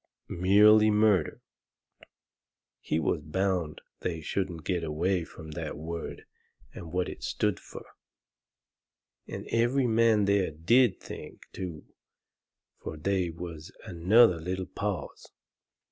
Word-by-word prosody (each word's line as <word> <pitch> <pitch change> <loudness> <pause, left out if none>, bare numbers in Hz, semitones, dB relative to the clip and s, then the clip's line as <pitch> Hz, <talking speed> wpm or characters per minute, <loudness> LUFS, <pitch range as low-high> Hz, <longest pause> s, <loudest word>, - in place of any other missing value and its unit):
Merely 105 +4 +5
murder." 105 -6 +2 1.4
He 80 - -1
was 80 0 0
bound 85 0 -2 0.2
they 85 -2 -3
shouldn't 85 0 -3
get 90 -3 -1
away 85 +4 0
from 80 -2 -11
that 75 - -5
word 80 +2 -6 0.5
and 80 - -9
what 90 0 0
it - - -8
stood - - -1
fur. - - -11 1.4
And - - -7
every 120 +3 +2
man 115 -2 +3
there 100 -1 +2
DID 90 +8 +3
think, - - -10
too, 85 -5 -6 1.0
fur 80 - -6
they 95 +2 0
was 85 0 -8
another 95 +1 +4
little 95 +3 -3
pause. 95 -5 -5
90 Hz, 115 wpm, -28 LUFS, 80-105 Hz, 1.4 s, Merely